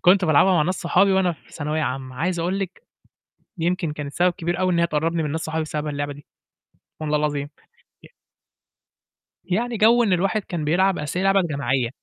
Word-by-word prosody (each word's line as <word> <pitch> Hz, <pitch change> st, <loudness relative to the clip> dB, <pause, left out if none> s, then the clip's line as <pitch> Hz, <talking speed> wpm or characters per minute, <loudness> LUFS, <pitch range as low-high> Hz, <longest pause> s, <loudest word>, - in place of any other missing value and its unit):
كنت 185 Hz, +1 st, +5 dB
بالعبها 160 Hz, +4 st, +4 dB
مع 170 Hz, -4 st, +3 dB
ناس 185 Hz, +4 st, 0 dB
صحابي 190 Hz, +3 st, +2 dB
وأنا 190 Hz, -2 st, +2 dB
في 160 Hz, -, -19 dB
ثانوية 155 Hz, +1 st, -2 dB
عامة، 130 Hz, -2 st, -4 dB
عايز 175 Hz, +4 st, -1 dB
أقول 180 Hz, +4 st, -1 dB
لِك 190 Hz, -2 st, -5 dB, 0.8 s
يمكن 170 Hz, -1 st, -1 dB
كانت 145 Hz, -1 st, -6 dB
سبب 180 Hz, +3 st, +2 dB
كبير 175 Hz, +1 st, -3 dB
أوي 185 Hz, -1 st, +2 dB
إن 170 Hz, -, +1 dB
هي 170 Hz, -, +3 dB
تقرّبني 165 Hz, +1 st, 0 dB
من 150 Hz, -, -2 dB
ناس 160 Hz, -, -2 dB
صحابي 160 Hz, 0 st, -2 dB
بسبب 155 Hz, -1 st, -4 dB
اللعبة 145 Hz, 0 st, -3 dB
دي، 145 Hz, 0 st, -14 dB, 0.7 s
والله 150 Hz, -1 st, 0 dB
العظيم. 145 Hz, -1 st, -1 dB, 0.6 s
ي -, -, -13 dB, 1.4 s
يعني 230 Hz, +5 st, -1 dB
جَو 235 Hz, +3 st, +5 dB
إن 200 Hz, -5 st, +2 dB
الواحد 195 Hz, +4 st, +1 dB
كان 170 Hz, -5 st, -4 dB
بيلعب 185 Hz, +5 st, +2 dB
أصل 150 Hz, +4 st, -3 dB
هي -, -, -1 dB
لعبة 195 Hz, 0 st, +4 dB
جماعية، 135 Hz, -7 st, -1 dB
170 Hz, 195 wpm, -23 LUFS, 150-185 Hz, 1.4 s, كنت